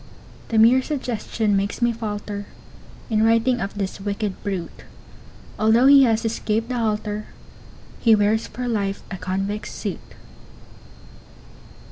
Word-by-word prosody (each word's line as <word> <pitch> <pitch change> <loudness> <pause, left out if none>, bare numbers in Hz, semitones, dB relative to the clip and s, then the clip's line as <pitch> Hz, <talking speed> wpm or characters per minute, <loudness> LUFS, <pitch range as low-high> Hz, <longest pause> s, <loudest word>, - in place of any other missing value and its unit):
The 225 - -1
mere 235 +4 +6
suggestion 235 -6 -2
makes 195 +1 -1
me 240 -1 +2
falter 205 -2 -5 0.6
In 215 -1 +2
writing 230 +2 +3
of 200 +1 -4
this 195 -1 -4
wicked 200 0 -3
brute; 190 -5 -5 0.8
Although 225 +3 +4
he 275 -1 +8
has 225 -1 +1
escaped 225 0 -1
the 250 - -2
halter, 215 -1 -2 0.7
He 225 -2 +5
wears 215 +2 +1
for 250 0 -5
life 200 -4 -2
a 190 - -4
convict's 195 +3 -3
suit. - - -4
215 Hz, 125 wpm, -22 LUFS, 205-230 Hz, 0.8 s, he